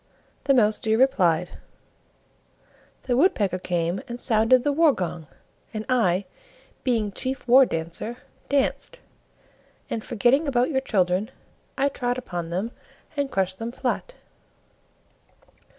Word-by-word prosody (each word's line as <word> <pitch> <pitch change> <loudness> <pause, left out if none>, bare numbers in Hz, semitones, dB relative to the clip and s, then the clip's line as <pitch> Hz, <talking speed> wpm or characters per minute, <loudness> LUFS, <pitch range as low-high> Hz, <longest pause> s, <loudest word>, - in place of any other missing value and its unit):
The 275 - +4
Mouse 215 -3 +3
deer 220 0 +1
replied: 180 -10 +2 1.4
"The 245 - 0
Woodpecker 215 - +2
came 175 0 -1
and 240 0 -6
sounded 230 +2 +3
the 290 - +2
war 310 0 +4
gong, 170 - -4 0.5
and 215 0 -3
I, 200 -7 +2 0.6
being 225 -5 0
Chief 260 +5 -4
War 260 +2 +7
Dancer, 170 +9 -4 0.3
danced; 285 - 0 0.9
and, 220 - -2
forgetting 245 +7 +2
about 255 +2 +1
your 265 -2 +1
children, 190 -3 +1 0.5
I 275 - +3
trod 245 -3 -2
upon 175 -9 -5
them 190 +7 -2 0.4
and 285 -1 -1
crushed 190 -5 -1
them 230 +1 -4
flat." - - -3
230 Hz, 120 wpm, -24 LUFS, 185-265 Hz, 1.4 s, War